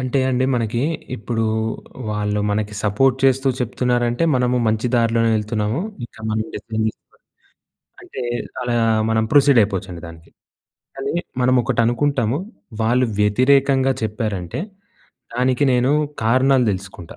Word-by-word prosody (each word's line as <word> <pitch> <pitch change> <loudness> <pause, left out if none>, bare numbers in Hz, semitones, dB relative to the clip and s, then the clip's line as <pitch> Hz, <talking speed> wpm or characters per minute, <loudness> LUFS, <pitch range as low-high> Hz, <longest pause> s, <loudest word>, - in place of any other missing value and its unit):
అంటే 130 +1 -1
అండి. 130 0 +1
మనకి 115 0 -1 0.3
ఇప్పుడు 115 0 -2 0.7
వాళ్ళు 105 0 -1
మనకి 105 0 -2
సపోర్ట్ 125 +6 +3
చేస్తూ 135 +1 +3
చెప్తున్నారంటే 120 +2 0
మనము 125 0 +1
మంచి 110 +3 0
దారిలోనే 115 0 +2
వెళ్తున్నాము. 110 +5 -1 0.3
ఇంకా 110 - -18
మనం 110 0 -1
డెసిషన్ 110 -1 -3
తీసుకుని - - -31 0.9
అంటే 130 - -8 0.4
అలా 120 -1 -1 0.3
మనం 110 0 +2
ప్రొసీడ్ 140 -3 +6
అయిపోవచ్చండి 95 -4 -4
దానికి. 80 0 -13 0.7
కానీ 135 +1 -3 0.3
మనం 125 +1 +3
ఒకటి 130 -2 -1
అనుకుంటాము. 125 0 +1 0.4
వాళ్ళు 125 +3 +2
వ్యతిరేకంగా 135 +5 +3
చెప్పారంటే 105 - -3 0.8
దానికి 130 +2 +1
నేను 125 +2 +2 0.3
కారణాలు 130 +2 +3
దెలుసుకుంటా. 95 -3 -7
120 Hz, 120 wpm, -20 LUFS, 105-130 Hz, 0.9 s, ప్రొసీడ్